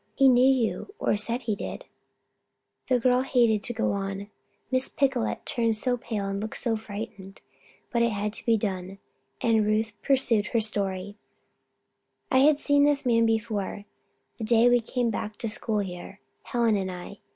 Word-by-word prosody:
He 270 - +5
knew 250 -1 +5
you 265 - -1
or - - +1
said 230 +4 0
he 215 - -1
did - - -7 0.5
" - - -53
The 255 - +3
girl 250 +1 +3
hated 235 -5 +2
to 240 - -2
go 225 - 0
on, 195 +1 -4 0.4
Miss 255 0 +2
Picolet 265 -4 -1
turned 230 -5 +1
so 245 +3 +1
pale 225 -4 -4
and 195 0 -3
looked 220 - -5
so 235 -2 0
frightened. 205 -2 -8 0.5
But 235 - +1
it 235 - +3
had 210 -1 -3
to - - -1
be 230 -1 +4
done, 195 -2 -4 0.4
and 225 -2 +3
Ruth 215 +1 0
pursued 235 -6 +3
her 235 - +1
story: 200 -2 -2 1.1
"I 260 - +5
had 290 +2 +5
seen 285 -1 +3
the 290 -1 +3
man 230 -2 +3
before 215 -2 -2 0.5
the - - -6
day 230 +1 +4
we 245 0 +4
came 240 0 -1
to 215 +2 -4
school 215 0 -1
here, 185 +1 -8 0.3
Helen 235 -3 +1
and 190 -1 -3
I. 180 +3 -9
225 Hz, 175 wpm, -26 LUFS, 205-245 Hz, 1.1 s, He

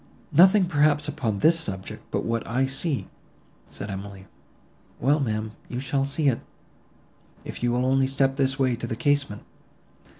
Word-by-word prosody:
"Nothing 185 +5 +6
probably 150 -3 +2
upon 125 -9 -2
this 165 +8 +4
subject, 95 -10 -6
but - - -2
what 115 0 0
I 130 +3 +1
see," 135 +2 -1 0.6
said 100 - -7
Emily.—"Well, 100 - -5
ma'am, 110 -4 -2
but - - -18
you 125 - -3
shall 135 +1 0
see 140 +2 0
it, 125 -4 +2 1.0
if - - -7
you 120 0 +1
will 125 +1 +1
only 135 0 +3
step 135 0 +1
this 135 -1 +1
way 130 -3 +2
to 120 - -5
the 115 - -3
casement." 140 -3 0
135 Hz, 160 wpm, -25 LUFS, 115-145 Hz, 1.0 s, Nothing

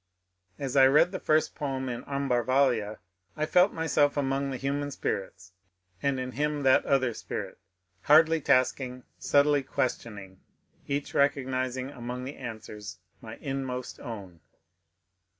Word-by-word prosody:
As 135 -2 -4
I 135 -1 +8
read 150 +6 +5
the 185 - -4
first 155 0 +2
poem 135 -2 -3
in 120 -1 -4
^' - - -22
Ambar 140 -4 0
valia," 120 -5 +1 0.4
I 155 - 0
felt 180 +5 +4
myself 150 -3 +1
among 135 0 0
the 130 - -3
human 140 +2 -2
spirits, 95 -8 -4 0.5
and 140 -2 0
in 130 0 -4
him 150 +3 -1
that 130 -1 +5
other 130 -3 +2
spirit, - - -6 0.2
" 90 -1 -43
hardly 160 +2 +6
tasking, 130 -1 +1 0.2
subtly 145 0 +3
questioning 105 -7 -4 0.2
" - - -43
each, 140 0 -3
recog 140 -1 +2
nizing 130 +1 -3
among 125 +1 -5
the 135 +3 -7
answers 105 -6 -8 0.2
my 110 0 -8
inmost 130 -3 -4
own. 100 -7 -8
130 Hz, 150 wpm, -28 LUFS, 120-145 Hz, 0.5 s, I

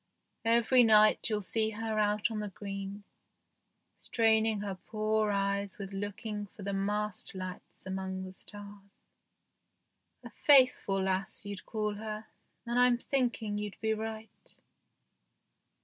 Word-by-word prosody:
Every 235 +2 +5
night 215 0 +5
you'll 210 -2 -1
see 220 +3 +1
her 220 0 -2
out 210 +1 +1
on 215 - -3
the 210 -1 -3
green, 195 +1 -6 0.9
straining 220 -2 +2
her 200 -2 -3
poor 215 -1 +1
eyes 200 -1 -1
with 195 -1 -7
looking 205 +1 -4
for 200 +2 -12
the 200 +1 -2
mast 205 0 -2
lights 185 0 -8
among 190 0 -4
the 185 0 -8
stars. 200 0 -10 1.2
A - - -9
faith 265 -4 +6
ful 195 -1 0
lass 190 +1 -2
you'd 200 -2 -7
call 215 -2 -1
her, 215 0 -5 0.4
and 240 +1 0
I'm 250 -1 +5
thinking 235 -5 -1
you'd 210 -1 -6
be 220 0 +1
right. 220 0 -7
210 Hz, 135 wpm, -31 LUFS, 200-220 Hz, 1.2 s, faith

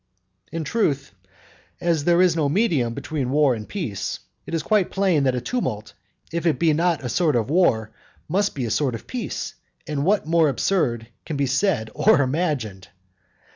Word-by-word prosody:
In 165 -1 -3
truth, 145 - 0 0.7
as 165 -4 0
there 175 +1 +5
is 175 -3 +3
no 150 -4 +1
medium 145 - +1
between 140 -5 -3
war 145 -1 +3
and 110 -2 -7
peace, 145 - -3 0.3
it - - -3
is 160 - -1
quite 210 -2 +2
plain 185 -8 +2
that 130 -1 +2
a 125 - -2
tumult, 120 - -3 0.4
if 170 +1 -1
it 160 - +2
be 165 -2 +3
not 165 -1 +1
a - - -2
sort 155 +3 +1
of 120 +3 0
war, 115 -12 +2 0.4
must 200 +5 0
be 130 -4 -2
a 115 - -3
sort 125 +1 +1
of 115 - -9
peace; 250 -2 -4 0.3
and 150 -3 -2
what 200 +3 +2
more 165 -1 +3
absurd 130 - 0 0.2
can 155 - -4
be 140 - +1
said 135 - 0
or 145 - +4
imagined? 130 - -2
150 Hz, 180 wpm, -23 LUFS, 125-175 Hz, 0.7 s, there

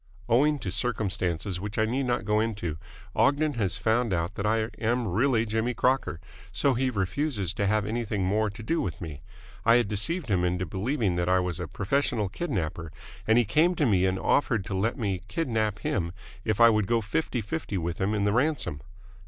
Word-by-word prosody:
Owing 145 +6 +4
to - - -4
circumstances 95 -6 -1
which 105 +2 -5
I 110 - +3
need 130 +4 -1
not 120 -3 0
go 105 +1 +2
into, 100 -8 -2 0.4
Ogden 145 +2 +3
has 105 -7 -1
found 115 -1 +1
out 85 +3 -2
that 100 0 -2
I 110 0 +1
am 120 +1 0
really 115 +4 +2
Jimmy 110 +2 -1
Crocker, 130 -9 +1 0.3
so 140 - +2
he 130 +2 +1
refuses 100 - -1
to 100 -3 0
have 105 0 +2
anything 110 -2 -2
more 105 +3 +1
to 110 +3 -9
do 165 +9 0
with 90 -2 -4
me. 80 -5 -7 0.4
I 115 +1 +6
had 120 -3 +3
deceived 120 - -2
him 90 -2 +2
into 90 +1 0
believing 100 - -1
that 90 0 0
I 95 0 +4
was 90 -2 -2
a 90 - -3
professional 105 - 0
kidnapper, 85 - -3 0.4
and 110 +1 +5
he 120 - +4
came 160 - +3
to 150 - +2
me 95 -5 +3
and 95 0 0
offered 110 -3 +1
to 95 - -5
let 110 +7 0
me 100 -7 -1
kidnap 110 - -1
him 85 -4 -2 0.3
if 110 0 -1
I 115 0 +8
would 105 -3 +1
go 115 -1 +2
fifty 120 +4 -1
fifty 110 -1 -3
with 85 0 -3
him 100 +3 +1
in 100 - 0
the 100 0 +2
ransom!" 125 - 0
110 Hz, 200 wpm, -27 LUFS, 95-120 Hz, 0.4 s, I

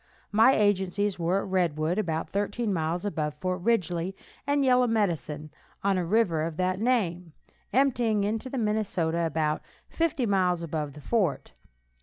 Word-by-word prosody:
My 225 +5 +6
agencies 200 -1 +1
were 175 +4 +1
at - - -7
Redwood, 170 -1 +1
about 165 -5 -2
thirteen 205 +2 -1
miles 170 +2 -1
above 155 -7 -2
Fort 185 +3 -3
Ridgely, 185 -4 0 0.3
and 285 0 +2
at - - +2
Yellow 250 -1 +4
Medicine, 160 - -1 0.3
on 200 0 +2
a - - 0
river 175 -3 +2
of 160 0 -3
that 185 0 0
name, 180 -9 0 0.4
emptying 240 -6 +2
into 220 +5 -2
the 265 - -4
Minnesota 195 -7 0
about 155 -1 -1 0.3
fifty 325 -6 0
miles 180 -4 +1
above 150 -3 -3
the 150 - -11
fort. 190 -6 0
185 Hz, 155 wpm, -27 LUFS, 165-220 Hz, 0.4 s, My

